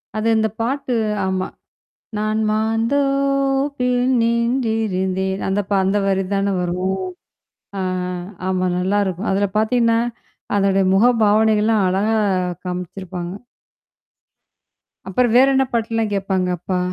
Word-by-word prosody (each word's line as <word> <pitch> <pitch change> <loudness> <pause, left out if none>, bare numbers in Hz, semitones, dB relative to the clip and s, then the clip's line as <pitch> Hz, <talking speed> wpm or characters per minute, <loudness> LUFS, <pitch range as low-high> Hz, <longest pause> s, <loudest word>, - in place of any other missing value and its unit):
அது 215 +1 -1
இந்த 220 0 +1
பாட்டு 260 +2 -1 0.3
ஆமா. 190 0 -1 0.7
நான் 215 +1 0
மாந்தோபில் 270 +3 +1
நின்றிருந்தேன். 220 -6 0
அந்த 195 +1 0
ப - - -15
அந்த 195 +2 +1
வரி 195 0 +1
தான 200 0 +1
வரும். 180 +2 -1 0.8
ஆ - - -1 0.7
ஆமா 185 -1 0
நல்லாயிருக்கும். 190 +1 0
அதில 200 +1 +1
பார்த்தீங்கன்னா 230 +1 +2 0.6
அதோட 195 -1 +2
முக 195 +4 +4 0.2
பாவனைகள்லாம் 215 0 +3
அழகா 200 +4 +1 0.5
காமிச்சிருப்பாங்க. 180 0 -5 1.7
அப்புறம் 230 +4 +1
வேற 265 +2 +6
என்ன 265 0 +3
பாட்டுலாம் 225 -2 0
கேட்பாங்க, 190 -2 0
அப்பா? 180 +1 -2
215 Hz, 105 wpm, -20 LUFS, 190-230 Hz, 1.7 s, வேற